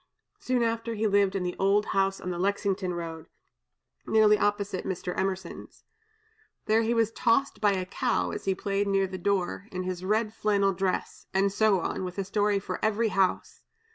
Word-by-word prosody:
Soon 250 Hz, -1 st, 0 dB
after, 230 Hz, 0 st, -1 dB
he 220 Hz, +1 st, -1 dB
lived 200 Hz, -2 st, +3 dB
in 190 Hz, -, -1 dB
the 180 Hz, 0 st, -3 dB
old 200 Hz, +2 st, +3 dB
house 195 Hz, 0 st, +1 dB
on 180 Hz, -, -4 dB
the 175 Hz, -, -4 dB
Lexington 195 Hz, -1 st, -1 dB
road, 165 Hz, -1 st, -6 dB, 0.8 s
nearly 215 Hz, -1 st, +5 dB
opposite 205 Hz, -2 st, -1 dB
Mr. 180 Hz, -1 st, -4 dB
Emerson's. 190 Hz, -2 st, -4 dB, 0.8 s
There 220 Hz, +1 st, +3 dB
he 230 Hz, +1 st, 0 dB
was 225 Hz, -1 st, +2 dB
tossed 255 Hz, +4 st, +1 dB
by 205 Hz, -2 st, +4 dB
a 185 Hz, -1 st, -2 dB
cow 185 Hz, -, -1 dB
as -, -, -6 dB
he 190 Hz, -1 st, +1 dB
played 200 Hz, +1 st, -1 dB
near 195 Hz, -1 st, +2 dB
the 185 Hz, 0 st, -6 dB
door, 195 Hz, +1 st, -1 dB
in 185 Hz, -2 st, -3 dB
his 185 Hz, -1 st, -4 dB
red 215 Hz, +2 st, 0 dB
flannel 200 Hz, -3 st, +1 dB
dress, 185 Hz, 0 st, -3 dB
and 195 Hz, +1 st, +3 dB
so 205 Hz, -2 st, +3 dB
on, 185 Hz, -, -3 dB
with 180 Hz, 0 st, -6 dB
a 195 Hz, -, 0 dB
story 205 Hz, +1 st, +1 dB
for 195 Hz, -, -5 dB
every 220 Hz, +1 st, +2 dB
house. 190 Hz, -2 st, 0 dB
195 Hz, 185 wpm, -27 LUFS, 185-215 Hz, 0.8 s, nearly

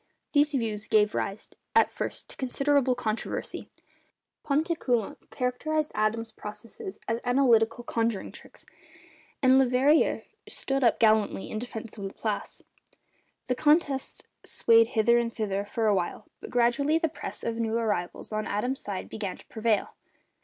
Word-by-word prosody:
These 295 Hz, 0 st, +3 dB
views 220 Hz, -4 st, -2 dB
gave 210 Hz, 0 st, +3 dB
rise 200 Hz, +2 st, -3 dB, 0.3 s
at -, -, +5 dB
first -, -, -5 dB
to -, -, -9 dB
considerable 275 Hz, 0 st, +2 dB
controversy. 225 Hz, -2 st, -3 dB, 0.7 s
Pontécoulant 280 Hz, -, -1 dB
characterised 300 Hz, +4 st, -1 dB
Adams's 220 Hz, +1 st, 0 dB
processes 210 Hz, -2 st, -9 dB
as 230 Hz, 0 st, 0 dB
'analytical 240 Hz, -2 st, +3 dB
conjuring 230 Hz, -3 st, -1 dB
tricks,' -, -, -13 dB, 0.8 s
and 260 Hz, 0 st, +6 dB
Leverrier 265 Hz, +4 st, +3 dB, 0.3 s
stood 270 Hz, 0 st, -1 dB
up 235 Hz, -, +4 dB
gallantly 215 Hz, -3 st, +2 dB
in 215 Hz, -, -2 dB
defence 225 Hz, -2 st, -7 dB
of 200 Hz, -, -4 dB
Laplace. 205 Hz, +2 st, -4 dB, 0.8 s
The 255 Hz, -, 0 dB
contest 295 Hz, -1 st, +1 dB, 0.2 s
swayed 230 Hz, 0 st, +4 dB
hither 235 Hz, +2 st, +5 dB
and 235 Hz, -1 st, -1 dB
thither 200 Hz, -3 st, -2 dB
for 220 Hz, +2 st, -2 dB
a 210 Hz, -, +4 dB
while, 185 Hz, +2 st, -2 dB
but -, -, -9 dB
gradually 250 Hz, +6 st, +2 dB
the 325 Hz, 0 st, +1 dB
press -, -, -7 dB
of 230 Hz, -1 st, -2 dB
new 225 Hz, 0 st, 0 dB
arrivals 205 Hz, -6 st, -2 dB
on 215 Hz, 0 st, -2 dB
Adams's 245 Hz, +6 st, -2 dB
side 200 Hz, -2 st, -4 dB
began 200 Hz, -4 st, -5 dB
to -, -, -16 dB
prevail. 220 Hz, -2 st, 0 dB
230 Hz, 140 wpm, -28 LUFS, 215-265 Hz, 0.8 s, and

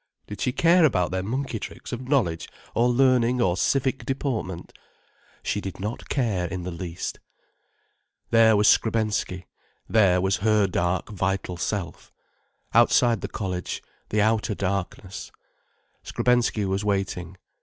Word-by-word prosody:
—did 105 Hz, -, -8 dB
she 125 Hz, -, +1 dB
care 170 Hz, +6 st, +4 dB
about 90 Hz, -, +2 dB
their 95 Hz, 0 st, -1 dB
monkey 130 Hz, +8 st, -3 dB
tricks -, -, -8 dB
of 125 Hz, +1 st, -6 dB
knowledge 90 Hz, -, +1 dB, 0.2 s
or 120 Hz, +2 st, +3 dB
learning 125 Hz, -1 st, +3 dB
or 90 Hz, -6 st, +2 dB
civic 135 Hz, +6 st, 0 dB
deportment? 120 Hz, -, -3 dB, 0.7 s
She 105 Hz, -, -1 dB
did 95 Hz, -2 st, -7 dB
not 105 Hz, +5 st, -5 dB
care 105 Hz, -10 st, 0 dB
in 95 Hz, -1 st, -5 dB
the 90 Hz, -, -4 dB
least. 85 Hz, 0 st, -5 dB, 1.1 s
There 115 Hz, -2 st, +6 dB
was 105 Hz, +1 st, +4 dB
Skrebensky, 110 Hz, -5 st, +1 dB, 0.4 s
there 95 Hz, -5 st, +4 dB
was 95 Hz, +1 st, +1 dB
her 105 Hz, 0 st, +3 dB
dark, 90 Hz, -1 st, -1 dB
vital 95 Hz, -2 st, -2 dB
self. 90 Hz, +1 st, -4 dB, 0.6 s
Outside 120 Hz, -1 st, +4 dB
the -, -, -3 dB
college, 90 Hz, -3 st, -4 dB, 0.3 s
the 105 Hz, -1 st, +2 dB
outer 110 Hz, 0 st, +1 dB
darkness, 95 Hz, 0 st, -4 dB, 0.7 s
Skrebensky 120 Hz, -4 st, +1 dB
was 95 Hz, +2 st, -1 dB
waiting. 95 Hz, -3 st, -2 dB
105 Hz, 135 wpm, -25 LUFS, 95-120 Hz, 1.1 s, There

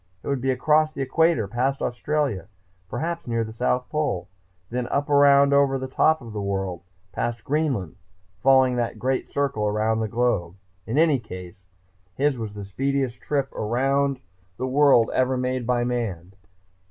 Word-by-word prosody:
It -, -, -9 dB
would 140 Hz, -3 st, -1 dB
be 135 Hz, -, -1 dB
across 155 Hz, +4 st, +3 dB
the 140 Hz, -3 st, -3 dB
equator, 135 Hz, -4 st, +2 dB
past 130 Hz, +6 st, -1 dB
Australia, 130 Hz, -, -1 dB, 0.4 s
perhaps 170 Hz, +4 st, -3 dB
near 115 Hz, -1 st, 0 dB
the 110 Hz, 0 st, -7 dB
South 125 Hz, +2 st, 0 dB
Pole, 150 Hz, -, -1 dB, 0.4 s
then 125 Hz, 0 st, -2 dB
up 145 Hz, +3 st, -1 dB
around 140 Hz, 0 st, +6 dB
over 140 Hz, -1 st, +3 dB
the 130 Hz, 0 st, -4 dB
top 155 Hz, +4 st, +2 dB
of 115 Hz, -3 st, -10 dB
the 105 Hz, -, -3 dB
world 95 Hz, -3 st, -3 dB, 0.3 s
past 120 Hz, 0 st, -3 dB
Greenland, 135 Hz, -, -1 dB, 0.4 s
following 130 Hz, -1 st, +4 dB
that 120 Hz, -2 st, -2 dB
great 130 Hz, +3 st, -1 dB
circle 135 Hz, -7 st, 0 dB
around 110 Hz, +2 st, +1 dB
the 110 Hz, -, -1 dB
globe. 105 Hz, -7 st, 0 dB, 0.3 s
In 115 Hz, +5 st, -2 dB
any 155 Hz, -4 st, +4 dB
case, 90 Hz, -4 st, -10 dB, 0.5 s
his 145 Hz, 0 st, +1 dB
was 110 Hz, -4 st, -6 dB
the 100 Hz, -1 st, -6 dB
speediest 135 Hz, +4 st, -2 dB
trip 140 Hz, -2 st, -2 dB
around 135 Hz, +4 st, 0 dB, 0.4 s
the 130 Hz, -, -2 dB
world 130 Hz, -3 st, +4 dB
ever 130 Hz, 0 st, +1 dB
made 125 Hz, -1 st, -2 dB
by 125 Hz, -1 st, +1 dB
man! 105 Hz, -8 st, -3 dB
125 Hz, 165 wpm, -24 LUFS, 110-140 Hz, 0.5 s, around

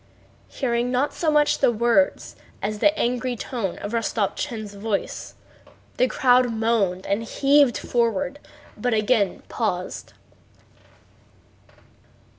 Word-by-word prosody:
Hearing 240 Hz, -2 st, -1 dB
not 255 Hz, +3 st, 0 dB
so 325 Hz, -, 0 dB
much 300 Hz, -1 st, +3 dB
the -, -, +4 dB
words 230 Hz, -4 st, +1 dB, 0.2 s
as 210 Hz, +1 st, -3 dB
the 305 Hz, +6 st, +3 dB
angry 250 Hz, +1 st, -1 dB
tone 225 Hz, -5 st, -4 dB
of 205 Hz, -, -6 dB
Rostopchín's 220 Hz, 0 st, -2 dB
voice, 205 Hz, 0 st, -4 dB, 0.6 s
the 255 Hz, -, +3 dB
crowd 250 Hz, -1 st, +3 dB
moaned 220 Hz, -5 st, 0 dB
and 200 Hz, +3 st, 0 dB
heaved 275 Hz, +3 st, +3 dB
forward, 270 Hz, +4 st, -1 dB, 0.4 s
but 240 Hz, +2 st, 0 dB
again 215 Hz, -3 st, +1 dB
paused. 185 Hz, -6 st, -3 dB
235 Hz, 105 wpm, -23 LUFS, 210-255 Hz, 0.6 s, the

